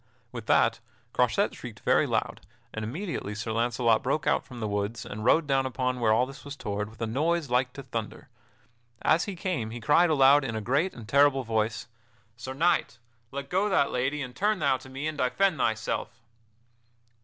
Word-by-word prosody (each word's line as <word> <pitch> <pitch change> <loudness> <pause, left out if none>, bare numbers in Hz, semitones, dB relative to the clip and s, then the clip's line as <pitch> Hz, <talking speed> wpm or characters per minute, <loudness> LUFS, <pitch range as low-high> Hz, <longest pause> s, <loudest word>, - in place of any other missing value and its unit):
With 120 -3 -8
that 115 0 +3 0.3
Croisette 125 -2 +2
shrieked - - -10
very - - +3
loud, - - -2 0.3
and 110 - -4
immediately 125 - -4
Sir 110 +2 -4
Launcelot 115 0 +2
broke 140 +3 -1
out - - +2
from 125 -2 -11
the 110 - -2
woods 105 +2 -3
and 105 +1 -6
rode 155 +7 +4
down 135 -2 +1
upon 125 0 -2
where 115 -2 +3
all 115 +3 +4
this 135 +3 -11
was 145 0 -7
toward 105 -5 -4
with 110 0 -17
a - - +1
noise 150 +5 0
like 125 0 +2
to 140 - -8
thunder. 115 -4 -6 0.8
As 160 +3 +3
he 200 -3 -5
came 165 - -2
he 120 +2 -6
cried 150 +9 +4
aloud 140 -1 +5
in 115 -4 -3
a - - -1
great 140 - 0
and 115 -3 -10
terrible 140 0 +4
voice: 110 -1 -1 0.5
"Sir 130 +3 -7
Knight, 160 -4 +1 0.3
let 140 +2 -6
go 190 +6 +1
that 140 -7 +2
lady, 135 +4 -1
and 125 -1 -8
turn 210 +1 +1
thou 140 -5 +2
to 130 +1 -14
me 135 +3 -5
and 155 -1 -3
defend 165 +5 +1
thyself!" 110 -2 -1
130 Hz, 195 wpm, -27 LUFS, 115-145 Hz, 0.8 s, aloud